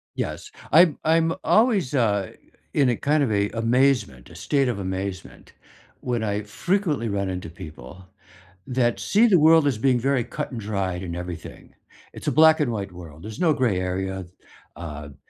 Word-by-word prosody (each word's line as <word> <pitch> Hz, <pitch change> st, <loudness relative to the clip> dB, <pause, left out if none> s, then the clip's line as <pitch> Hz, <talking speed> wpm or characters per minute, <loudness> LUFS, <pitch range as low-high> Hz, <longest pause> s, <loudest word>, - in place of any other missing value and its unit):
Yes. -, -, -5 dB, 0.2 s
I'm 165 Hz, -1 st, +6 dB
I'm 165 Hz, +1 st, +2 dB
always, 215 Hz, -, +2 dB
uh, 105 Hz, -7 st, +1 dB, 0.4 s
in 140 Hz, -3 st, +3 dB
a 120 Hz, -, +2 dB
kind 150 Hz, +5 st, +1 dB
of 125 Hz, -, 0 dB
a 100 Hz, 0 st, +1 dB
amazement, 115 Hz, -, +1 dB
a -, -, -14 dB
state 140 Hz, -2 st, 0 dB
of 120 Hz, -5 st, -2 dB
amazement, 95 Hz, -1 st, -6 dB, 0.5 s
when 120 Hz, -3 st, -2 dB
I 105 Hz, 0 st, -2 dB
frequently 150 Hz, -, -1 dB
run 100 Hz, -1 st, -2 dB
into 90 Hz, -2 st, -5 dB
people 80 Hz, 0 st, -11 dB, 0.6 s
that 125 Hz, -2 st, 0 dB
see 220 Hz, +4 st, +3 dB
the 190 Hz, -6 st, +5 dB
world 160 Hz, -1 st, +5 dB
as 135 Hz, -6 st, 0 dB
being 125 Hz, +2 st, +2 dB
very 135 Hz, 0 st, +1 dB
cut-and-dried 100 Hz, -7 st, -4 dB
and 85 Hz, -2 st, -5 dB
everything, 90 Hz, -1 st, -8 dB, 0.4 s
it's -, -, -10 dB
a -, -, +3 dB
black 160 Hz, +1 st, +6 dB
and 145 Hz, -5 st, +1 dB
white 100 Hz, -3 st, -4 dB
world, 85 Hz, -3 st, -12 dB
there's 110 Hz, +1 st, -8 dB
no 165 Hz, -3 st, +3 dB
gray 120 Hz, -9 st, +1 dB
area, 95 Hz, +1 st, -3 dB, 0.5 s
um, 75 Hz, -4 st, -8 dB
110 Hz, 165 wpm, -24 LUFS, 95-140 Hz, 0.6 s, I'm